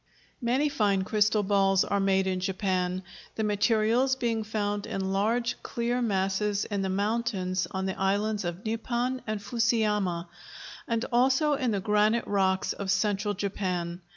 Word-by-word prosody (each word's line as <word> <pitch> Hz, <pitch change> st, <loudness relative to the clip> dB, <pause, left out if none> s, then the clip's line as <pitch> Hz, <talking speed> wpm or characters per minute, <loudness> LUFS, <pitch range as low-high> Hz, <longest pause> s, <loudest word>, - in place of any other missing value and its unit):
Many 255 Hz, +5 st, +2 dB
fine 205 Hz, -9 st, +1 dB
crystal 210 Hz, +1 st, +2 dB
balls 195 Hz, -1 st, +3 dB
are 200 Hz, -, 0 dB
made 190 Hz, -1 st, +2 dB
in 185 Hz, -1 st, -1 dB
Japan, 185 Hz, -1 st, -1 dB, 0.3 s
the 220 Hz, -, -1 dB
materials 220 Hz, +5 st, +2 dB
being 230 Hz, -4 st, -1 dB
found 205 Hz, -1 st, -2 dB
in 190 Hz, 0 st, -2 dB
large, 230 Hz, +4 st, 0 dB
clear 240 Hz, +1 st, -2 dB
masses 200 Hz, -1 st, 0 dB
in 200 Hz, -2 st, -2 dB
the 190 Hz, -, -1 dB
mountains 195 Hz, -2 st, -1 dB
on 190 Hz, 0 st, -3 dB
the 190 Hz, 0 st, -3 dB
islands 205 Hz, +2 st, 0 dB
of 175 Hz, +3 st, -5 dB
Nippon 240 Hz, +3 st, -1 dB
and 215 Hz, -1 st, -2 dB
Fusiyama 210 Hz, -5 st, 0 dB, 0.6 s
and 230 Hz, 0 st, 0 dB
also 265 Hz, +5 st, +3 dB
in 265 Hz, -3 st, 0 dB
the 205 Hz, -3 st, 0 dB
granitic 210 Hz, +3 st, +2 dB
rocks 190 Hz, -2 st, +1 dB
of 200 Hz, -1 st, -5 dB
Central 205 Hz, +1 st, +1 dB
Japan. 180 Hz, -3 st, -3 dB
205 Hz, 150 wpm, -28 LUFS, 190-230 Hz, 0.6 s, balls